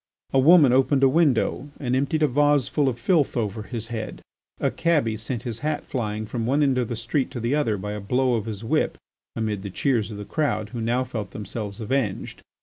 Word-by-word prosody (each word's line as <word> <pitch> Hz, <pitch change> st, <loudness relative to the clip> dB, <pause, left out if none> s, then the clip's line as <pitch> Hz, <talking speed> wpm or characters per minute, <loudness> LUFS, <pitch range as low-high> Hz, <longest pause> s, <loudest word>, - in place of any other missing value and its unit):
A 135 Hz, -, +5 dB
woman 145 Hz, -2 st, +7 dB
opened 135 Hz, +1 st, +3 dB
a -, -, +8 dB
window 140 Hz, -2 st, +2 dB
and 125 Hz, -3 st, 0 dB
emptied 140 Hz, +4 st, +1 dB
a -, -, +5 dB
vase 145 Hz, -1 st, +3 dB
full 145 Hz, -3 st, +1 dB
of 120 Hz, -, -4 dB
filth 145 Hz, +1 st, +1 dB
over 110 Hz, -2 st, -2 dB
his 115 Hz, 0 st, -6 dB
head, 115 Hz, -2 st, -5 dB, 0.4 s
a -, -, +1 dB
cabby 150 Hz, -10 st, +1 dB
sent 115 Hz, +2 st, -5 dB
his 115 Hz, -3 st, -5 dB
hat 150 Hz, +2 st, -2 dB
flying 110 Hz, -4 st, -3 dB
from 115 Hz, +1 st, -3 dB
one 140 Hz, +4 st, +3 dB
end 135 Hz, -3 st, +2 dB
of 120 Hz, -, 0 dB
the 120 Hz, -, -3 dB
street 120 Hz, +4 st, -1 dB
to 120 Hz, -, -6 dB
the 120 Hz, +3 st, -1 dB
other 120 Hz, -8 st, +1 dB
by 105 Hz, +2 st, -5 dB
a 105 Hz, -, -4 dB
blow 125 Hz, +5 st, +1 dB
of 110 Hz, -3 st, -1 dB
his 110 Hz, -1 st, -6 dB
whip 110 Hz, -, 0 dB, 0.4 s
amid 110 Hz, -3 st, -2 dB
the 100 Hz, -, -6 dB
cheers 115 Hz, +1 st, 0 dB
of 105 Hz, -, -7 dB
the 105 Hz, -, -6 dB
crowd 120 Hz, -6 st, -1 dB
who 120 Hz, -2 st, -5 dB
now 120 Hz, +3 st, +1 dB
felt 110 Hz, -6 st, -5 dB
themselves 105 Hz, -1 st, -6 dB
avenged. 110 Hz, -2 st, -2 dB
120 Hz, 225 wpm, -24 LUFS, 110-140 Hz, 0.4 s, a